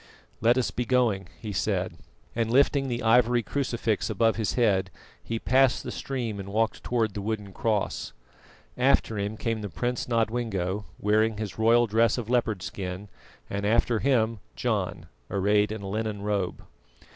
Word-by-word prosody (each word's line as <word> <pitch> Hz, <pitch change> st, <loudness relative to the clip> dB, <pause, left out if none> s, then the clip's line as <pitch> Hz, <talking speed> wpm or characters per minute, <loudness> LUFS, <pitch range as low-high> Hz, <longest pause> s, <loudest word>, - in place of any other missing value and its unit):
"Let 120 Hz, +3 st, +4 dB
us 130 Hz, -, +1 dB
be 125 Hz, -, -2 dB
going," 115 Hz, -7 st, +1 dB
he 105 Hz, -2 st, -5 dB
said, -, -, -1 dB, 0.4 s
and 115 Hz, -1 st, 0 dB
lifting 135 Hz, +2 st, +3 dB
the 120 Hz, -1 st, -2 dB
ivory 120 Hz, +1 st, +4 dB
crucifix 120 Hz, -1 st, -1 dB
above 115 Hz, -1 st, +2 dB
his 105 Hz, -7 st, -1 dB
head, 95 Hz, -4 st, +2 dB, 0.3 s
he 115 Hz, -, -3 dB
passed 130 Hz, +2 st, +3 dB
the -, -, -5 dB
stream 120 Hz, -7 st, -4 dB
and 100 Hz, 0 st, -6 dB
walked 110 Hz, +2 st, 0 dB
towards 115 Hz, -4 st, 0 dB
the 100 Hz, -, -4 dB
wooden 105 Hz, -2 st, -4 dB
cross. 105 Hz, -1 st, -1 dB, 0.7 s
After 125 Hz, -4 st, +3 dB
him 100 Hz, +2 st, -3 dB
came 115 Hz, -1 st, -2 dB
the 105 Hz, -, -4 dB
Prince 120 Hz, +6 st, -2 dB
Nodwengo, 110 Hz, -5 st, -1 dB
wearing 110 Hz, +1 st, +2 dB
his 105 Hz, -1 st, -5 dB
royal 115 Hz, +2 st, +5 dB
dress 115 Hz, +1 st, +2 dB
of 120 Hz, -1 st, -4 dB
leopard 110 Hz, -6 st, +1 dB
skin, 95 Hz, +1 st, -5 dB, 0.4 s
and 100 Hz, 0 st, -3 dB
after 115 Hz, +2 st, +2 dB
him, 115 Hz, -5 st, +2 dB, 0.2 s
John, -, -, -2 dB, 0.2 s
arrayed 105 Hz, +2 st, +2 dB
in 110 Hz, -2 st, -5 dB
a -, -, -5 dB
linen 105 Hz, 0 st, -3 dB
robe. 100 Hz, -3 st, -2 dB
110 Hz, 160 wpm, -27 LUFS, 100-120 Hz, 0.7 s, royal